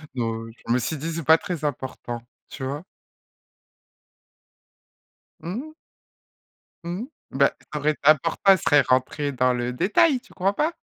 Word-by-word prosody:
Non, 115 -2 -2 0.2
je 115 - +2
me 125 - +3
suis 155 +6 -2
dit 165 +4 -4
c'est 165 0 -4
pas 160 0 +7
très 170 -2 -5
important, 130 -4 -4 0.3
tu - - -8
vois? 140 +4 -4 2.6
Mmh. 245 - -5 1.1
Mmh, 180 +7 -3 0.3
bah 140 +1 +3 0.2
ça 150 - -3
aurait 150 +1 +1
important 155 +3 +3
elle 190 - +6
serait 145 -4 +4
rentrée 130 +3 0
dans 125 -1 +2
le 120 0 -2
détail, 250 - +3
tu 245 - -21
crois 195 +2 +1
pas? 305 +10 0
150 Hz, 145 wpm, -24 LUFS, 130-175 Hz, 2.6 s, pas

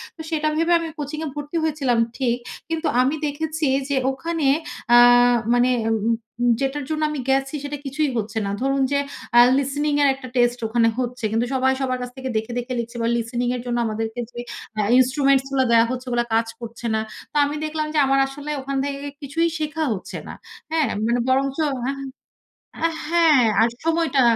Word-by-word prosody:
তো 320 - -9
সেটা 310 -2 0
ভেবে 330 +2 +1
আমি 330 - -4
কোচিং 295 +2 -4
এ - - -3
ভর্তি 295 +3 -4
হয়েছিলাম 285 -6 +1 0.2
ঠিক। 245 -3 +1 0.3
কিন্তু 325 0 -1
আমি 270 +4 +1
দেখেছি 310 +1 -2 0.2
যে 280 - +1 0.2
ওখানে 315 +2 -2 0.5
আ - - +9 0.6
মানে 245 +1 +3 0.2
উ - - +2 0.5
উ - - +3
যেটার 275 +2 -1
জন্য 310 0 -2
আমি 300 - -4
গেছি 270 +2 +1
সেটা 290 0 -4
কিছুই 290 +2 0
হচ্ছে 215 0 -3
না। 200 - -2
ধরুন 275 +1 +1
যে 280 - +2 0.3
অ্যা 240 - +8 0.2
listening 290 +2 0
এর 285 - +5
একটা 265 -1 -10
টেস্ট 240 0 +2
ওখানে 230 0 +2
হচ্ছে। 250 -2 -3
কিন্তু 230 +2 +1
সবাই 265 0 +2
সবার 255 -1 -1
কাছ 250 - -4
থেকে 260 0 -4
দেখে, 220 +2 -3
দেখে 245 +1 -5
লিখছে 235 +1 -5
বা - - +1
listening 240 +1 -1
এর 245 - -4
জন্য 240 -1 -1
আমাদেরকে 220 +2 -3
যে 240 - -8 0.4
অ্যা 210 -1 0
instruments 270 +1 +3
গুলা 265 -1 +2
দেয়া 230 0 +6
হচ্ছে 255 0 -4
ওগুলা 240 0 +1
কাজ 225 0 +2
করছে 235 +1 -8
না। 220 - +1 0.3
তো - - -31
আমি 290 - -3
দেখলাম 310 0 -2
যে 305 - +2
আমার 270 0 +3
আসলে 285 +2 -8
ওখান 275 +1 -3
থেকে 280 0 -3 0.2
কিছুই 325 +4 0
শেখা 310 +1 -2
হচ্ছে 190 - -7
না। - - -7 0.4
হ্যাঁ? 320 -3 +2 0.2
মানে 235 +2 +1
বরঞ্চ 270 +1 +1
আহা 260 0 -2 0.9
আ - - +6 0.2
হ্যাঁ 330 -4 +5 0.2
আর 230 - +4
সময়টা 325 -4 +2
270 Hz, 190 wpm, -22 LUFS, 245-300 Hz, 0.9 s, আ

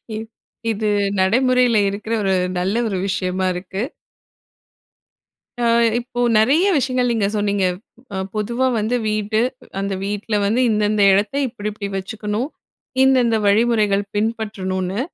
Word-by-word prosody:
இ - - -3 0.5
இது 215 0 -2 0.3
நடைமுறையில 250 +4 +3
இருக்கிற 210 +3 -4
ஒரு 190 -1 +2 0.3
நல்ல 190 +4 -1
ஒரு 195 -3 -2
விஷயமா 185 -1 -1
இருக்கு. 190 +3 -5 1.8
அ - - +2 0.3
இப்போ 245 0 -7 0.2
நெறைய 270 +11 +4
விஷயங்கள் 255 -2 +1
நீங்க 220 -4 +1
சொன்னீங்க. 205 -2 +1 0.5
அ - - -3 0.2
பொதுவா 235 +5 0
வந்து 220 +4 0
வீடு, 215 +1 0 0.4
அந்த 195 0 -2
வீட்ல 205 +2 -2
வந்து 230 +5 +2
இந்தந்த 210 -1 +1
இடத்த 205 +6 +1
இப்டிப்டி 210 -3 -5
வச்சுக்கணும், 210 +6 -3 0.5
இந்தந்த 250 -4 +4
வழிமுறைகள் 210 -1 +3
பின்பற்றணுன்னு, 205 -3 -2
210 Hz, 115 wpm, -20 LUFS, 200-235 Hz, 1.8 s, நெறைய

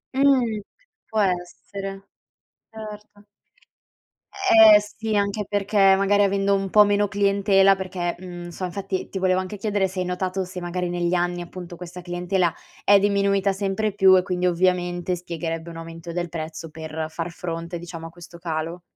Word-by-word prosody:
Mh. 255 -6 +3 0.5
Può 220 - -1
essere. 195 +1 -3 0.6
Certo. 210 -1 -11 1.1
Eh, 220 - +7
sì, 215 +1 -4
anche 200 0 0
perché 200 -1 +3
magari 200 +1 +3
avendo 200 0 +2
un 195 -1 -2
po' 210 +1 +7
meno 205 0 +2
clientela, 200 -1 +3
perché, 185 -2 -3
mhmm, 175 -1 -8
so 185 +2 -5
infatti 195 +1 -4
ti 195 - -5
volevo 185 0 +2
anche 185 +2 -5
chiedere 205 -2 0
se 185 0 -6
hai 180 - -1
notato 185 +1 -2
se 180 0 -7
magari 175 0 -3
negli 175 0 -1
anni, 175 0 0
appunto, 175 0 -8
questa 180 0 -9
clientela 175 0 0 0.3
è 200 0 +6
diminuita 200 -1 +2
sempre 200 +1 -1
più 190 -2 +6
e 180 - +2
quindi 180 -1 -2
ovviamente 180 0 +1
spiegherebbe 165 -1 -5
un 165 - -9
aumento 165 +1 -8
del 175 0 -2
prezzo 160 0 -6
per 160 0 -5
far 165 +1 -5
fronte, 170 0 -5
diciamo, 165 -1 -8
a - - -10
questo 170 0 -13
calo. 165 +1 -4
185 Hz, 160 wpm, -23 LUFS, 175-200 Hz, 1.1 s, Eh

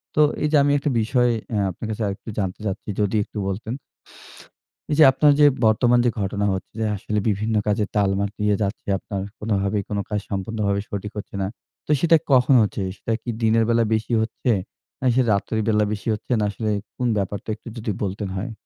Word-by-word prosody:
তো 155 - +5 0.2
এই - - +3
যে 155 - +5
আমি 145 - +3
একটা 140 +1 -1
বিষয়ে 120 +2 +2 0.2
এ্যা 105 -3 +1
আপনার 90 - -8
কাছে 110 +1 -4
আরেকটু 100 +2 -6
জানতে 95 0 -2
চাচ্ছি 100 +1 -4
যদি 105 +1 0
একটু 105 - -11
বলতেন। 110 +4 -3 1.2
এই 150 - +2
যে - - +9
আপনার 145 +2 +4
যে 145 - +7 0.2
বর্তমান 120 +3 +4
যে - - +5
ঘটনা 100 +1 -1
হচ্ছে 95 - -5
যে 110 - 0
আসলে 105 +2 -2
বিভিন্ন 110 +2 0
কাজে 105 0 +2
তালমা 100 -1 +2
দিয়ে 105 -1 +2
যাচ্ছে 100 +1 -3
আপনার 100 0 -5 0.2
কোনভাবেই 100 -1 0
কোন 105 - -2
কাজ 105 - 0
সম্পূর্ণভাবে 100 0 -1
সঠিক 105 +1 -4
হচ্ছে 100 - -7
না। 95 - 0 0.4
তো - - -2
সেটা 165 -1 +5
কখন 130 +1 +5
হচ্ছে? 105 -1 -1
সেটা 115 +3 -3
কি 120 - -6
দিনের 115 +1 +4
বেলা 115 0 +3
বেশি 110 +2 -1
হচ্ছে? 115 +2 -1 0.5
না 130 - -2
সেটা 130 -2 +3
রাত্রের 110 +2 -1
বেলা 105 -1 +3
বেশি 105 - -6
হচ্ছে? 110 - -7
না 105 - +1
আসলে 110 +2 -3 0.3
কোন 125 - 0
ব্যাপারটা? 100 +2 -3
একটু 115 - -17
যদি 110 -1 -2
বলতেন 100 0 -3
হয়। 115 +5 -4
105 Hz, 200 wpm, -23 LUFS, 100-115 Hz, 1.2 s, যে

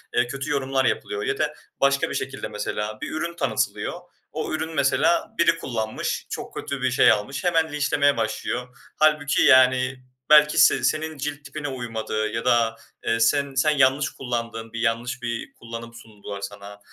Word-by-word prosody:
eee, 120 - +3
kötü 135 +4 -5
yorumlar 135 -2 0
yapılıyor 420 - -1
ya 415 -1 -1
da - - 0 0.3
başka 140 0 +3
bir - - -4
şekilde - - -4
mesela 105 +1 -4
bir - - -4
ürün 165 +2 -3
tanıtılıyor. 130 -9 -1 0.3
O - - -4
ürünü 160 +1 -3
mesela 170 +5 +2
biri 170 0 +4
kullanmış, 110 -7 -3
çok - - -6
kötü 140 -2 -4
bir 130 - +1
şey 125 - +6
almış 110 +6 -2
hemen 165 -3 +2
linçlemeye 145 -1 +2
başlıyor. 125 +2 -3 0.2
Hâlbuki, 150 -2 +3
yani, 130 0 +4 0.3
belki 150 0 +6
se - - +5
senin 155 0 0
cilt 145 +1 -5
tipine 145 +1 -5
uymadı 115 -4 -3
ya 115 - -3
da, 115 -1 +3 0.3
eee, 115 - +1
sen 140 +4 +2
sen 145 +4 +3
yanlış 140 0 +3
kullandın, 115 -3 -5
bir 115 - -4
yanlış 120 +2 -1
bir 120 -1 -4
kullanım 115 0 -9
sundular 105 -3 -9
sana. 100 0 -8
130 Hz, 165 wpm, -24 LUFS, 115-145 Hz, 0.3 s, şey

